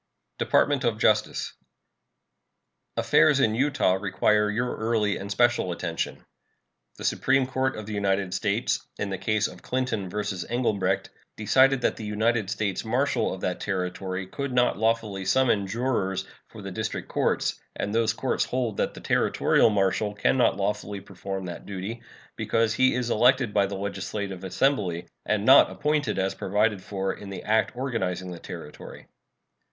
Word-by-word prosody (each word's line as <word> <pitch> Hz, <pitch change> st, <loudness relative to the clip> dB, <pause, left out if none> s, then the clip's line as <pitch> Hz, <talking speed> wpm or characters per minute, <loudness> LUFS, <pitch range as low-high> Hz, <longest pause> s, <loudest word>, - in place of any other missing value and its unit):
DEPARTMENT 145 Hz, -2 st, +2 dB
OF 115 Hz, -3 st, +1 dB
JUSTICE. 110 Hz, 0 st, +1 dB, 1.4 s
Affairs 145 Hz, -2 st, +4 dB
in 110 Hz, -5 st, +3 dB
Utah 135 Hz, -5 st, +2 dB
require 105 Hz, +2 st, +2 dB
your 120 Hz, +4 st, -1 dB
early 110 Hz, -2 st, +1 dB
and 100 Hz, -, -7 dB
special 120 Hz, -3 st, +2 dB
attention. 85 Hz, -, -4 dB, 0.7 s
The -, -, -9 dB
Supreme 135 Hz, -1 st, +2 dB
Court 130 Hz, +1 st, -1 dB
of 110 Hz, -, -6 dB
the 110 Hz, -, -6 dB
United 100 Hz, -2 st, 0 dB
States, 105 Hz, +4 st, 0 dB
in 100 Hz, -, -3 dB
the 95 Hz, -, -3 dB
case 110 Hz, 0 st, +1 dB
of -, -, -12 dB
Clinton 125 Hz, -7 st, -2 dB
vs. 100 Hz, -2 st, -3 dB
Englebrecht, 100 Hz, -6 st, 0 dB, 0.3 s
decided 130 Hz, +4 st, +4 dB
that -, -, 0 dB
the -, -, -7 dB
United 110 Hz, 0 st, 0 dB
States 105 Hz, -3 st, -2 dB
marshal 125 Hz, +5 st, 0 dB
of 95 Hz, -, -6 dB
that 90 Hz, -, -2 dB
Territory 95 Hz, 0 st, -3 dB
could 140 Hz, +8 st, -5 dB
not 125 Hz, 0 st, +3 dB
lawfully 110 Hz, -3 st, 0 dB
summon 105 Hz, -1 st, +2 dB
jurors 95 Hz, -4 st, -1 dB, 0.2 s
for -, -, -12 dB
the -, -, -6 dB
district -, -, -4 dB
courts; -, -, 0 dB
and 105 Hz, -, -3 dB
those 115 Hz, -1 st, +2 dB
courts 130 Hz, +3 st, -1 dB
hold 120 Hz, -5 st, -2 dB
that -, -, -1 dB
the -, -, -9 dB
Territorial -, -, +3 dB
marshal 105 Hz, 0 st, 0 dB
can 105 Hz, -, +2 dB
not 125 Hz, -3 st, +3 dB
lawfully 105 Hz, 0 st, -2 dB
perform 95 Hz, 0 st, -6 dB
that 85 Hz, -1 st, -8 dB
duty, 100 Hz, +4 st, -5 dB, 0.3 s
because 115 Hz, -1 st, +1 dB
he 130 Hz, +1 st, +3 dB
is 125 Hz, -2 st, -1 dB
elected 125 Hz, -1 st, +3 dB
by 100 Hz, -1 st, +3 dB
the 100 Hz, -, -5 dB
legislative 100 Hz, -1 st, -4 dB
assembly, 95 Hz, -5 st, 0 dB, 0.2 s
and 105 Hz, -1 st, +1 dB
not 135 Hz, +3 st, +8 dB
appointed 150 Hz, -1 st, -1 dB
as 95 Hz, 0 st, 0 dB
provided 105 Hz, 0 st, 0 dB
for 95 Hz, 0 st, -3 dB
in 100 Hz, -, -10 dB
the 100 Hz, -, -7 dB
act 110 Hz, +1 st, +1 dB
organizing 105 Hz, -8 st, -2 dB
the 85 Hz, -, -7 dB
Territory. -, -, -10 dB
105 Hz, 155 wpm, -26 LUFS, 95-120 Hz, 1.4 s, not